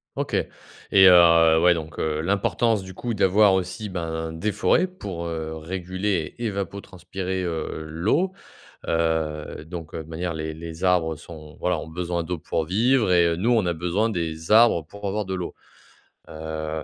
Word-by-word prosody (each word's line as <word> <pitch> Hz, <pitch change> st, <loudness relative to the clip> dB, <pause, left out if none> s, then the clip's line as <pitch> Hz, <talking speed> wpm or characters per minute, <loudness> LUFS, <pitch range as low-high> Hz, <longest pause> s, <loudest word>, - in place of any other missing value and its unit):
OK. -, -, -2 dB, 0.6 s
Et, 95 Hz, -1 st, +8 dB
heu, 85 Hz, -2 st, +7 dB
ouais. 90 Hz, 0 st, +6 dB
Donc, 80 Hz, -1 st, -6 dB
heu, 75 Hz, -1 st, -1 dB
l'importance 100 Hz, +4 st, +1 dB
du 95 Hz, 0 st, -9 dB
coup 120 Hz, +4 st, -4 dB
d'avoir 100 Hz, 0 st, +4 dB
aussi, 95 Hz, +4 st, -2 dB
ben, 80 Hz, -3 st, -4 dB
des 100 Hz, +7 st, -2 dB
forêts 180 Hz, -, +2 dB
pour, 95 Hz, -, -7 dB
heu, 80 Hz, -1 st, -4 dB
réguler 90 Hz, +1 st, -3 dB
et 120 Hz, -, -4 dB
évapotranspirer, 95 Hz, -2 st, -4 dB
heu, 80 Hz, -2 st, -4 dB
l'eau. 110 Hz, -, 0 dB, 0.5 s
Heu, 80 Hz, -2 st, -1 dB
donc 85 Hz, -1 st, -8 dB
de 80 Hz, -, -4 dB
manière 85 Hz, +2 st, -4 dB
les 80 Hz, 0 st, -4 dB
les 80 Hz, +2 st, -8 dB
arbres 85 Hz, -3 st, +2 dB
sont 75 Hz, -2 st, -12 dB
voilà 90 Hz, -1 st, 0 dB
ont -, -, -7 dB
besoin 85 Hz, 0 st, -2 dB
d'eau 90 Hz, +1 st, -3 dB
pour 80 Hz, 0 st, -2 dB
vivre 110 Hz, +4 st, +2 dB
et 85 Hz, -1 st, +4 dB
nous 110 Hz, +7 st, 0 dB
on 115 Hz, -5 st, +3 dB
a 85 Hz, -, 0 dB
besoin 90 Hz, +7 st, 0 dB
des 80 Hz, -4 st, -4 dB
arbres 110 Hz, -8 st, +5 dB
pour 100 Hz, +4 st, -10 dB
avoir 105 Hz, +1 st, -2 dB
de 95 Hz, -, -4 dB
l'eau. 90 Hz, -1 st, -4 dB, 0.8 s
Heu, 80 Hz, 0 st, -5 dB
85 Hz, 170 wpm, -24 LUFS, 80-95 Hz, 0.8 s, Et